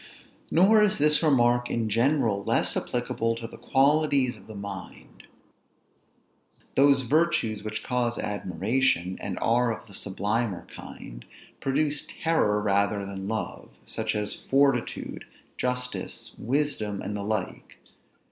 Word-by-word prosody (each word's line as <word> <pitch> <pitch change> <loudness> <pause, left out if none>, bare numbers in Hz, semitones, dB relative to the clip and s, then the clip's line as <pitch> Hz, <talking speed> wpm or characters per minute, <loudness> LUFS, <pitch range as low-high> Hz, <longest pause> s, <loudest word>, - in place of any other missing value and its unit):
Nor 205 +6 +5
is 210 0 +3
this 150 +1 +4
remark 120 -5 +3
in 115 -1 -1
general 115 -2 +2
less - - +2
applicable 115 0 -1
to 115 0 -7
the 115 - -10
qualities 140 -2 +3
of 100 -2 -17
the 110 - -9
mind. 100 -2 -9 1.5
Those 140 -1 +5
virtues 145 - +1
which 110 0 -5
cause 120 -2 -1
admiration, 95 0 0
and - - -4
are 120 +1 +3
of 110 - -6
the 100 - -15
sublimer 100 +1 -2
kind, - - -10 0.4
produce 145 +2 0 0.2
terror 105 -11 +2
rather 100 0 +1
than 95 0 -6
love; 110 +1 -4 0.2
such - - -2
as 105 -1 -1
fortitude, 135 -3 0 0.3
justice, 125 0 -4
wisdom, 120 -6 -1
and 105 +1 -4
the 100 - -3
like. 105 -2 -4
115 Hz, 125 wpm, -27 LUFS, 105-135 Hz, 1.5 s, Nor